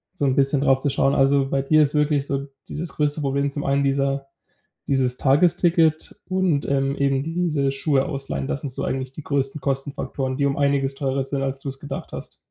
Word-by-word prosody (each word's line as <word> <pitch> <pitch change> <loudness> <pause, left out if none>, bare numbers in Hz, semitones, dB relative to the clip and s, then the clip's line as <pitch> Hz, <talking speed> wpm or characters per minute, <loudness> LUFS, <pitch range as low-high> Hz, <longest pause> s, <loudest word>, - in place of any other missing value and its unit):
so 145 - -1
'n 130 -1 +2
bisschen 140 0 +2
drauf 135 -2 +3
zu 140 - 0
schauen. 135 +1 +2
Also, 135 0 +3
bei 135 0 0
dir 155 +3 +4
ist 145 - -1
wirklich 150 -2 +2
so 140 0 -3 0.2
dieses 165 +3 -5
größte 150 0 0
Problem 140 0 0
zum 145 0 -4
einen 140 0 +1
dieser 135 0 0 0.6
dieses 130 -2 +1
Tagesticket 160 +2 +2
und, 185 -6 +1
ähm, 135 0 +1
eben 140 -1 +1
diese 155 -4 0
Schuhe 135 -1 +1
ausleihen. 135 - -4
Das 140 - -3
sind 140 - -4
so 130 - -5
eigentlich 130 -1 -2
die 150 +3 -9
größten 140 +1 -1
Kostenfaktoren, 135 -1 -3
die 140 - +1
um 140 0 0
einiges 140 -1 +1
teurer 135 -1 -1
sind, 135 +1 -3
als 135 0 -2
du 135 - -5
es 135 0 -8
gedacht 140 0 -7
hast. - - -8
140 Hz, 205 wpm, -23 LUFS, 135-145 Hz, 0.6 s, dir